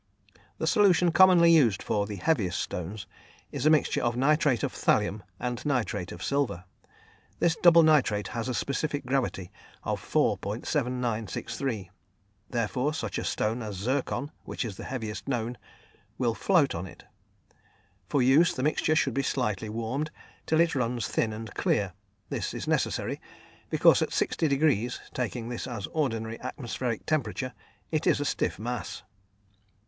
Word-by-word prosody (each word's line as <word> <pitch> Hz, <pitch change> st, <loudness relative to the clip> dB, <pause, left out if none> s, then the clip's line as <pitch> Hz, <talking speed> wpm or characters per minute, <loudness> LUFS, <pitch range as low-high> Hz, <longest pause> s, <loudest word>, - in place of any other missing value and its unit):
The -, -, -2 dB
solution 180 Hz, -5 st, +4 dB
commonly 175 Hz, -2 st, +7 dB
used 125 Hz, -, +4 dB
for 100 Hz, -1 st, 0 dB
the 105 Hz, -, -5 dB
heaviest 95 Hz, -, 0 dB
stones 95 Hz, +4 st, -4 dB, 0.5 s
is -, -, 0 dB
a -, -, +7 dB
mixture 155 Hz, -1 st, +3 dB
of 120 Hz, -1 st, 0 dB
nitrate 140 Hz, -3 st, +3 dB
of -, -, -1 dB
thallium 105 Hz, +1 st, +1 dB, 0.2 s
and 125 Hz, -1 st, -3 dB
nitrate 110 Hz, -, -1 dB
of 85 Hz, -, -8 dB
silver. 140 Hz, -11 st, 0 dB, 0.7 s
This 165 Hz, -2 st, +2 dB
double 170 Hz, -1 st, +7 dB
nitrate 130 Hz, -10 st, +3 dB
has 115 Hz, +2 st, -3 dB
a 125 Hz, -, -1 dB
specific 145 Hz, +2 st, -2 dB
gravity 125 Hz, -9 st, -1 dB, 0.3 s
of -, -, -2 dB
4.7963, 115 Hz, -, -1 dB, 0.6 s
therefore 125 Hz, +5 st, -1 dB
such -, -, -3 dB
a -, -, -3 dB
stone 110 Hz, +3 st, -1 dB
as 105 Hz, -3 st, -5 dB
zircon, 130 Hz, +7 st, -2 dB
which -, -, -4 dB
is 105 Hz, -4 st, -5 dB
the -, -, -8 dB
heaviest 110 Hz, -4 st, -5 dB
known, 120 Hz, -2 st, -1 dB, 0.6 s
will 120 Hz, -3 st, +1 dB
float 165 Hz, -, +3 dB
in 85 Hz, +3 st, -4 dB
it. -, -, -14 dB, 1.1 s
For 140 Hz, -, +2 dB
use, 140 Hz, +7 st, +5 dB
the 130 Hz, -, -2 dB
mixture 155 Hz, +1 st, +2 dB
should 135 Hz, -4 st, +2 dB
be 135 Hz, -, +1 dB
slightly 110 Hz, -6 st, -1 dB
warmed 115 Hz, +7 st, -2 dB, 0.4 s
till 160 Hz, +1 st, +4 dB
it 170 Hz, 0 st, +2 dB
runs 125 Hz, -2 st, -1 dB
thin 110 Hz, -, 0 dB
and 110 Hz, -1 st, -7 dB
clear; 100 Hz, -3 st, 0 dB, 0.4 s
this -, -, -3 dB
is -, -, -5 dB
necessary, -, -, 0 dB, 0.5 s
because -, -, +5 dB
at -, -, +1 dB
60° 140 Hz, -6 st, +1 dB
(taking 120 Hz, -1 st, -3 dB
this 120 Hz, +1 st, -4 dB
as 120 Hz, -6 st, -4 dB
ordinary 115 Hz, -7 st, -2 dB
atmospheric 125 Hz, -2 st, -4 dB
temperature) 140 Hz, -4 st, -1 dB, 0.4 s
it 155 Hz, -2 st, 0 dB
is -, -, +4 dB
a 145 Hz, -, -1 dB
stiff -, -, -1 dB
mass. 120 Hz, +1 st, -5 dB
125 Hz, 150 wpm, -28 LUFS, 110-145 Hz, 1.1 s, commonly